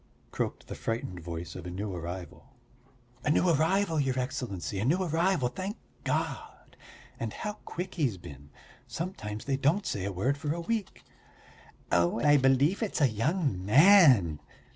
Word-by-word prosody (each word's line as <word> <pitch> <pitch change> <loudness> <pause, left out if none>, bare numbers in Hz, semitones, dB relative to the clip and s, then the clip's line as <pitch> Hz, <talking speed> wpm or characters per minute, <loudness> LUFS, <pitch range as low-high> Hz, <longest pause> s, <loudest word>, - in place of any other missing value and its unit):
croaked - - -3
the - - -7
frightened 115 -5 -4
voice 85 0 -6
of 90 -1 -7
a - - -4
new 95 +2 -4
arrival. 90 +9 -8 0.7
"A - - 0
new 165 +4 +3
arrival, 165 +2 +2
your 135 -2 0
Excellency, 125 -7 -3
a - - -1
new 170 +10 +2
arrival, 170 -4 +1
thank 190 - -5 0.3
God! - - -4 0.4
And - - -3
how 210 -1 -5
quick 180 +2 -5
he's 135 - 0
been! 70 -4 -12 0.4
Sometimes 155 - -5
they 135 -1 0
don't 160 +9 +1
say 100 - -2
a 100 - -2
word 125 +10 -1
for 150 +1 -2
a - - -4
week." 210 +3 -3 0.9
"Oh, 85 +5 +2
I 145 +3 +5
believe 135 - +3
it's 215 -5 -1
a 140 -4 +4
young 130 - -1
man!" 130 - +6
135 Hz, 160 wpm, -29 LUFS, -, 0.9 s, man